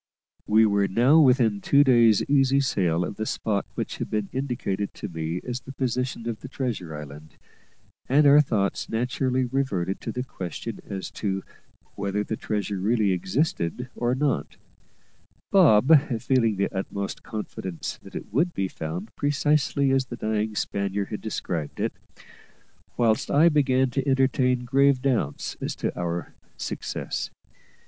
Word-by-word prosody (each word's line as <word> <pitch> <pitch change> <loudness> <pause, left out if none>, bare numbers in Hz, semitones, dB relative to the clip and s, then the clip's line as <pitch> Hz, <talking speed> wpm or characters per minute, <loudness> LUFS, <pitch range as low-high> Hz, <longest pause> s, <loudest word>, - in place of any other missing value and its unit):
We 110 +1 +5
were 100 -1 +2
now 125 +11 +5
within 125 -8 +4
two 140 0 +5
days' 120 -5 +5
easy 135 -1 +4
sail 90 -10 +1
of 100 - -6
the 110 - -2
spot 100 -3 -1
which - - -4
had - - -4
been 105 -2 -2
indicated 120 -7 -2
to - - -5
me 80 0 -4
as 125 0 -4
the 130 +1 -10
position 125 -2 -2
of 115 -2 -3
the - - -9
treasure 115 - -4
island: 75 +1 -10 0.7
and 145 +3 +5
our 145 +1 +8
thoughts 105 -8 -1
naturally 125 +2 0
reverted 120 -9 -1
to - - -4
the 125 - -3
question 90 - -6
as 95 -1 -5
to 95 -2 -1 0.5
whether 100 +1 -2
the 110 - -3
treasure 105 -2 -3
really 105 0 +2
existed 100 - -1
or 120 +1 0
not; 145 +1 -1 0.9
Bob 155 - +7 0.2
feeling 115 -3 +2
the 100 +1 -1
utmost 100 +1 -4
confidence 95 -5 -6
that - - -13
it - - -7
would 170 +8 +1
be 95 - 0
found 85 +5 -6
precisely 145 -1 +1
as 135 -1 +2
the 120 - -7
dying 110 -1 -1
Spaniard 100 -1 -2
had 105 - -5
described 85 -8 -4
it, - - -1 1.0
whilst 115 +2 +2
I 160 +4 +5
began 130 -4 +2
to 135 +2 -2
entertain 130 -2 +2
grave 135 +1 +4
doubts 125 - -1
as - - -3
to - - -3
our 85 0 -3 0.2
success. - - -4
115 Hz, 150 wpm, -25 LUFS, 100-135 Hz, 1.0 s, our